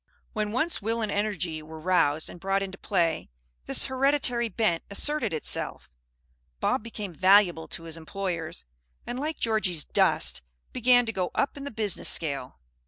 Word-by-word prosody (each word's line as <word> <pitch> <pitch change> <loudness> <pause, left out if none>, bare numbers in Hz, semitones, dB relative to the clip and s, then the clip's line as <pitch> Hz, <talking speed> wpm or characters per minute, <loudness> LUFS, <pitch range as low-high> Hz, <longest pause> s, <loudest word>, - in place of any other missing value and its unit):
When 215 -1 -1
once 315 +7 +1
will 225 +2 -1
and 210 - -2
energy 190 -6 -2
were 160 +1 -10
roused 155 -3 +2
and 175 - -9
brought 195 +2 0
into 195 0 -7
play, 170 -5 0 0.4
this - - +3
hereditary 260 -3 +1
bent 190 -5 +1
asserted 240 +2 +1
itself. 155 - -3 0.7
Bob - - +1
became 210 -4 -6
valuable 185 -1 +4
to 165 - -4
his 165 0 -6
employers, 165 - -4 0.4
and 245 - -4
like 310 +2 -2
Georgie's 215 -8 +2
"dust," - - +2 0.3
began 245 0 +4
to 225 - -3
go 185 -3 -1
up 280 - 0
in 280 -1 -7
the - - -3
business 215 -6 +1
scale. 140 -5 0
200 Hz, 160 wpm, -27 LUFS, 165-230 Hz, 0.7 s, valuable